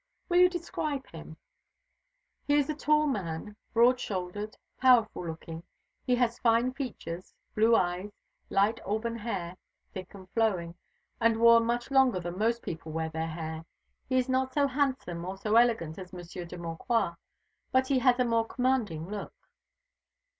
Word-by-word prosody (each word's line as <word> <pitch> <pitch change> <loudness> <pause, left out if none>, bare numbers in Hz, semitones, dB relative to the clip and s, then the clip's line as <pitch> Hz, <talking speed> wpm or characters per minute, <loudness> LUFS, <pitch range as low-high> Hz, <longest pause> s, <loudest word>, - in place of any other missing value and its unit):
"Will 350 - +3
you 360 0 +7
describe 310 -5 -3
him?" 160 -1 -10 1.1
"He 290 - +4
is 290 +1 +2
a - - -4
tall 300 0 +3
man, 205 - -3 0.2
broad 245 +2 +4
shouldered, 205 +2 -4 0.2
powerful 230 -8 +4
looking. 160 0 -7 0.5
He 250 - +4
has 240 -1 0
fine 235 +2 +3
features, 215 -10 -6 0.2
blue 225 +2 +4
eyes, 180 +2 0 0.4
light 205 +3 +2
auburn 220 +3 -2
hair, 190 -6 -4 0.4
thick 185 +1 -8
and 190 -2 -12
flowing, 190 -7 0 0.5
and 230 -1 +3
worn 230 0 +7
much 240 +2 -1
longer 265 -7 +4
than 175 +1 -5
most 230 +2 +1
people 160 -1 -6
wear 160 0 -2
their 160 0 -3
hair. 160 0 -5 0.5
He 260 - +2
is 255 0 +2
not 260 0 0
so 290 -1 +4
handsome 260 - -1
or 190 +2 -5
so 210 +2 0
elegant 225 -9 +3
as 185 0 -10
Monsieur 175 0 -7
de 175 +1 -9
Maucroix, 170 +5 -1 0.6
but 260 0 +3
he 260 -1 +2
has 250 -1 +4
a 250 - +2
more 230 -1 +1
commanding 235 - 0
look." 205 0 -6
225 Hz, 160 wpm, -29 LUFS, 175-255 Hz, 1.1 s, you